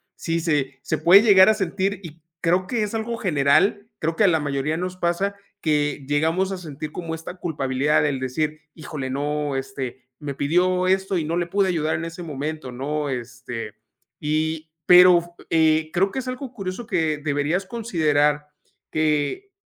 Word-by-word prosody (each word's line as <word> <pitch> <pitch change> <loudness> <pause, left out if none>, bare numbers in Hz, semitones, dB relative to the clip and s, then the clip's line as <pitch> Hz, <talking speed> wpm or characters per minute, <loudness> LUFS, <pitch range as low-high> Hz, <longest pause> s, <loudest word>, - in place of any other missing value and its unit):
Sí, 165 0 -2
se 140 -5 -1
se 155 - -2
puede 190 +6 +7
llegar 195 -2 +7
a - - +6
sentir, 195 0 -1
y 165 -1 -11 0.2
creo 180 +2 +1
que 225 -2 0
es 210 - -4
algo 230 +1 -2
general. 180 +3 +2
Creo 165 +1 -1
que 215 - +2
a - - +6
la 160 -3 +3
mayoría 145 +2 -1
nos 180 +1 -3
pasa 185 +3 0 0.3
que 145 -3 0
llegamos 160 +6 +1
a - - -4
sentir 155 -3 -7
como 165 -2 -5
esta 165 +3 -8
culpabilidad 145 -4 0
del 140 -3 0
decir: 155 +4 -2
"Híjole, 145 -4 -6
no, 145 +1 -2
este 135 -1 -5
me 145 -2 -5
pidió 180 +6 +1
esto, 190 0 +1
y 160 - -1
no 165 +2 -1
le 175 - 0
pude 195 +2 +1
ayudar 160 -4 0
en 165 - -3
ese 165 +2 -7
momento", 150 -3 -5
¿no? 145 +3 -3
Este, 120 -3 -6 0.5
y 155 +1 -1 0.2
pero, 175 -1 +6 0.2
eh, 160 -1 +3
creo 195 +2 +2
que 265 - -3
es 255 - -6
algo 255 0 -5
curioso 195 +2 -5
que 160 -7 0
deberías 150 +5 -1
considerar, 150 -10 +1 0.4
que 155 - 0
160 Hz, 175 wpm, -23 LUFS, 145-185 Hz, 0.5 s, puede